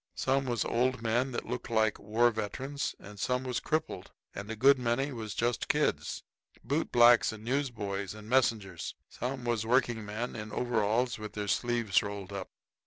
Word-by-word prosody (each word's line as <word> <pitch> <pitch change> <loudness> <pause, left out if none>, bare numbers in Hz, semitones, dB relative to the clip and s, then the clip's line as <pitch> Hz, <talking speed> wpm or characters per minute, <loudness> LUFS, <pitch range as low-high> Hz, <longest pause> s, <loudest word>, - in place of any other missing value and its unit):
Some 135 0 +1
was 120 -3 0
old 125 0 +1
men 120 +4 +1
that 120 - -3
looked 125 +1 -5
like 110 -2 +2
war 115 +4 +3
veterans, 130 +6 -3
and 105 0 -11
some 125 +6 0
was 125 -2 -1
crippled, 155 +1 -2 0.2
and 100 +1 -7
a 110 - -3
good 135 +4 +5
many 125 +4 0
was 110 -4 -5
just 120 -2 0
kids - - 0 0.4
bootblacks 120 -4 +5
and 110 -1 -9
newsboys 110 -7 -2
and 105 0 -11
messengers. 110 -8 +1
Some 125 +1 -4
was 120 -2 0
working 120 -1 +2
men 110 +4 -4
in 105 -1 -6
overalls, 120 +1 +1
with 105 -1 -7
their 105 -1 -3
sleeves 115 -2 +2
rolled 100 -1 -6
up. 95 -2 -5
115 Hz, 170 wpm, -31 LUFS, 105-125 Hz, 0.4 s, good